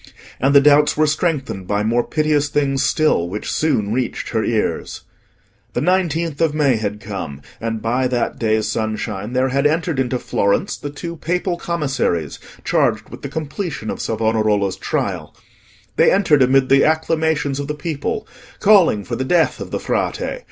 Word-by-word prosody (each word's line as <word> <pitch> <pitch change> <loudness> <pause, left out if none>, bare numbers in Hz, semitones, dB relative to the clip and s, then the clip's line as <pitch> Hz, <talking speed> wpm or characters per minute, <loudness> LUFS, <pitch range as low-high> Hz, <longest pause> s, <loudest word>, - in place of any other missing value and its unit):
And 135 +3 +2
the 140 - +9
doubts 150 +1 +4
were 155 - +4
strengthened 150 - -1
by 105 0 0
more 115 +2 +1
piteous 150 0 +1
things 140 -2 0
still, 150 - +2
which 105 +4 -4
soon 110 -10 0
reached 125 0 -2
her - - 0
ears. - - -2 0.7
The - - -1
nineteenth 170 -4 0
of 160 -2 +2
May 140 -6 +3
had 105 -1 -3
come, 95 -10 -6 0.2
and 115 -1 -3
by 125 +3 +1
that 125 -1 -2
day's 110 -1 +1
sunshine 110 -1 -3
there 130 +1 +2
had 140 +2 +2
entered 160 -1 -1
into 125 -1 0
Florence 100 -4 0
the 145 - -6
two 170 +4 -7
Papal 180 +3 -1
Commissaries, 135 - -2 0.3
charged - - +1
with - - -10
the - - -5
completion 155 - -4
of - - -5
Savonarola's 110 -3 +1
trial. - - -3 0.6
They - - +5
entered 175 -8 +3
amid 130 +1 +4
the 135 0 +5
acclamations 160 -2 +1
of 140 - -4
the 150 - -3
people, 160 +6 -3 0.3
calling 190 - +5
for 90 - -4
the 130 - -2
death 165 +4 +2
of - - -6
the - - -3
Frate. - - -1
140 Hz, 165 wpm, -19 LUFS, 110-155 Hz, 0.7 s, the